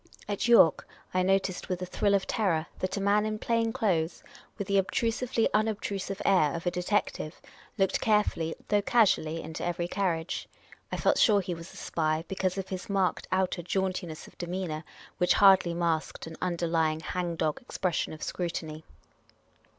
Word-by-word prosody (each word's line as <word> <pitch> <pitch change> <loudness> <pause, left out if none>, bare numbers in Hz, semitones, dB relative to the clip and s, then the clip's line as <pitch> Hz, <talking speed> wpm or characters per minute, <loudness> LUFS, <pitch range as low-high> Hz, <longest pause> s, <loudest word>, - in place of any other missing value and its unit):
At 205 +2 -1
York, 230 -9 +6 0.3
I 185 - +2
noticed 190 0 0
with 180 -1 -1
a 180 - -3
thrill 200 +2 +1
of 195 - +1
terror 170 -8 0
that 185 +1 -2
a - - 0
man 200 +1 +3
in 215 0 -2
plain 230 +1 0
clothes, 175 -7 0 0.3
with 200 - -3
the 200 0 +3
obtrusively 230 +4 0
unobtrusive 205 -2 -1
air 170 -7 +4
of 170 - -5
a 175 - +2
de 180 0 -3
tective, 180 -4 -1 0.4
looked 195 -2 +1
carefully 210 -7 +1
though 205 -1 +3
casually 195 -8 +2
into 160 0 -6
every 175 0 -1
carriage. 175 -3 -2 0.4
I - - -2
felt - - +2
sure 210 -3 +5
he 185 -2 -3
was 165 0 -9
a - - -13
spy, 155 0 -1
because 190 -1 -1
of 190 -1 -4
his 185 +1 -5
marked 195 -2 0
outer 185 -1 +1
jaunti 185 +1 -1
ness 155 -1 -8
of - - -17
demeanour, 175 -3 -3 0.4
which 180 - +4
hardly 190 -4 +5
masked 170 -2 -1
an 160 0 -8
underlying 165 -3 0
hang 175 0 -3
dog 155 -2 -1
expression 185 -8 -2
of 155 - -8
scrutiny. 160 -3 -4
185 Hz, 175 wpm, -29 LUFS, 165-200 Hz, 0.4 s, York